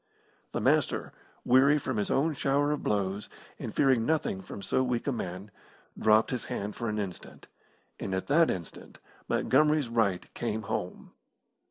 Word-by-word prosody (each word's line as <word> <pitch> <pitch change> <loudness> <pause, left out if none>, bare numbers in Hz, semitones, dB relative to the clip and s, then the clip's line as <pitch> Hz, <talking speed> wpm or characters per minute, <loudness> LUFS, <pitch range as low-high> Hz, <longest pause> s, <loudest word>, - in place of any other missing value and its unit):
The - - -2
Master, - - +1 0.3
weary 135 +4 +5
from 130 -5 -3
his 105 - 0
own 155 +4 +2
shower 140 +1 +1
of 150 - -1
blows, 100 0 -1 0.3
and - - -5
fearing 130 -4 +3
nothing 150 -9 0
from 100 +1 -9
so 115 - +1
weak 125 -2 -1
a 140 - +1
man, 95 -3 -5 0.4
dropped 110 0 +3
his 125 -3 -3
hand 105 +1 -4
for 115 - -3
an 105 - -2
instant, 100 -4 -6 0.5
and 95 - -2
at 95 - -2
that 160 +3 +4
instant 85 -3 -6 0.3
Montgomery's 150 -1 +3
right 105 -6 0
came 110 -2 -3
home. 110 -4 -4
115 Hz, 160 wpm, -29 LUFS, 100-135 Hz, 0.5 s, weary